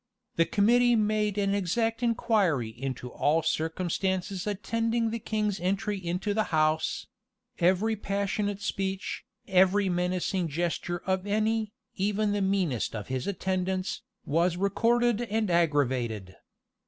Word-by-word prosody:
The 165 - +4
committee 240 +4 +4
made 210 -1 +1
an 200 -1 +1
exact 225 +5 0
inquiry 215 - +1
into 125 +1 -5
all 155 +3 +1
circumstances 185 +4 -1
attending 230 +3 0
the 230 - -3
king's 210 -2 -1
entry 195 +2 -1
into 180 +4 -1
the 215 0 +1
house: 155 0 +1 0.5
every 190 +6 +3
passionate 200 0 -2
speech, 195 -1 -3 0.2
every 190 +1 +4
menacing 180 0 0
gesture 175 +2 -2
of 190 +1 -1
any, 215 +1 0 0.2
even 205 +2 +1
the 205 0 0
meanest 190 - 0
of 105 +1 -6
his 130 0 -2
attendants, 185 -1 -2 0.2
was 170 +3 +1
recorded 235 +4 +2
and 220 -4 -1
aggravated. 130 - +1
195 Hz, 120 wpm, -28 LUFS, 170-210 Hz, 0.5 s, The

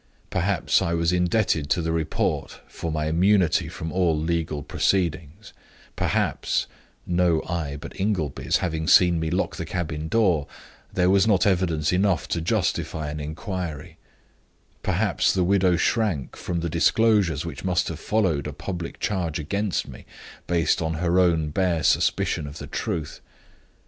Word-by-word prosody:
Perhaps 95 0 +1
I 85 - 0
was 85 +1 +1
indebted 90 -4 +1
to - - +2
the 80 -1 -1
report 80 -2 -2
for 85 - -5
my 75 -1 -1
immunity 90 +2 +2
from 80 0 -6
all 90 -4 +2
legal 80 -2 -2
proceedings; 85 +2 -1 0.4
perhaps - - 0 0.4
(no 85 -2 +2
eye 80 -5 -3
but - - -10
Ingleby's 95 -8 0
having 80 -2 -3
seen 85 -2 +5
me 80 0 -1
lock 90 - -1
the - - -3
cabin 80 -3 -3
door) 90 -8 +2 0.4
there 90 0 +2
was 100 +2 +4
not 100 -4 +3
evidence 85 -5 +1
enough 90 -4 +1
to 85 - -1
justify 80 -2 -1
an 75 - -5
inquiry; 80 0 -5 0.8
perhaps - - +1
the 95 - +1
widow 95 -1 +3
shrank 95 - 0
from 85 -1 -3
the 85 - -2
disclosures 90 -2 +2
which 75 -5 -7
must 90 -2 +1
have 80 -1 -5
followed 90 -8 0
a 75 - -5
public 85 +2 -6
charge 90 -7 -1
against 100 +6 -2
me, - - -12 0.4
based 85 -3 +1
on 80 0 -1
her 85 +2 +1
own 85 -4 +2
bare 90 -1 0
suspicion 75 - +1
of 70 +2 -9
the 70 - -7
truth. 75 +1 -4
85 Hz, 150 wpm, -24 LUFS, 80-95 Hz, 0.8 s, seen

